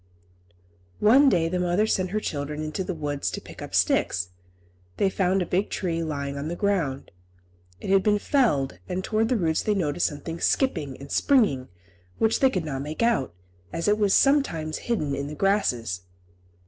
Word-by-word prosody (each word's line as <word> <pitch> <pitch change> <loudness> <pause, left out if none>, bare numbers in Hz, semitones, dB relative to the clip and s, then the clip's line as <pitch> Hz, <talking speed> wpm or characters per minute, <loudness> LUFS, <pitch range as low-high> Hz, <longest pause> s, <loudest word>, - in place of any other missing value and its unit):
One 265 +7 +6
day 170 -7 +2
the 180 +2 -1
mother 180 +4 +2
sent 185 -4 0
her 210 +3 -1
children 150 -4 -4
into 155 +5 -3
the 185 -1 -4
wood 145 -2 -4
to - - -2
pick - - -12
up - - -6
sticks. 90 0 +1 0.7
They 195 - +2
found 185 0 +1
a - - -5
big 185 +4 0
tree 165 -3 -2
lying 140 -3 -3
on 145 - -4
the 170 - -3
ground. 175 -10 -1 0.7
It - - -4
had 195 0 +5
been 210 +1 +3
felled, 205 - +1
and 185 +1 -2
towards 220 +2 0
the 250 - +2
roots 160 -5 +1
they 210 - 0
noticed 170 -3 +1
something 165 +3 -6
skipping 160 - 0
and 140 +1 -11
springing, 210 - +2 0.5
which 220 0 +2
they 265 - +5
could 185 -9 -2
not 135 -3 -3
make 155 +9 -3
out, 230 - +1 0.4
as 165 +2 -3
it 210 +1 +3
was 205 -2 +3
sometimes 170 - +2
hidden 155 -12 0
in 140 +1 -3
the 150 - -6
grasses. 125 - 0
175 Hz, 185 wpm, -25 LUFS, 145-210 Hz, 0.7 s, One